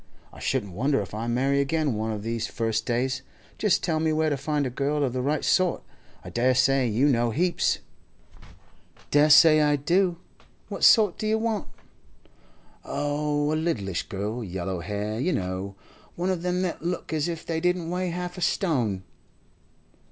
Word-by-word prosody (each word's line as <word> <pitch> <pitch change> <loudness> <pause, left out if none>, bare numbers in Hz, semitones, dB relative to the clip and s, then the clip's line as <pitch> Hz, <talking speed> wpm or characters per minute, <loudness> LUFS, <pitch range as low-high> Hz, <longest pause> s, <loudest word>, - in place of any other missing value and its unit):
I - - -12
shouldn't 105 -8 -2
wonder 135 +8 +1
if - - -12
I 110 +2 -4
marry 135 +4 +1
again 150 -1 0
one 110 +1 -2
of 105 -1 -5
these 115 0 -2
first 115 -1 -2
days. 130 +2 0 0.4
Just 210 -4 +2
tell 160 -3 0
me 160 0 +1
where 155 0 +1
to - - +1
find 145 +1 -1
a 130 - -3
girl 145 +3 -1
of 130 -3 -1
the 130 - -1
right 145 +4 -1
sort. 185 -2 +2 0.4
I - - -8
dare 125 +2 +2
say 130 0 +3
you 120 +6 +2
know 120 -4 +2
heaps.' 175 +9 +1 1.3
'Dessay 155 +1 +7
I 150 -1 +3
do. 175 +5 +1 0.5
What - - -5
sort 210 -6 +6
do 215 - -2
you 220 +1 +2
want?' 220 -2 -2 1.2
'Oh, 145 0 -1
a - - +1
littlish 120 - -2
girl—yellow 95 -3 -4
hair, 105 +4 -3
you 175 +7 0
know—one 100 - -5
of 180 -3 -2
them 180 +1 -1
that 180 -3 -3
look 175 0 -3
as 155 0 0
if 165 -2 -5
they 160 -1 -2
didn't 180 -1 0
weigh 180 0 -1
half 180 +1 -5
a - - -8
stone. 130 - 0
145 Hz, 170 wpm, -26 LUFS, 115-170 Hz, 1.3 s, Dessay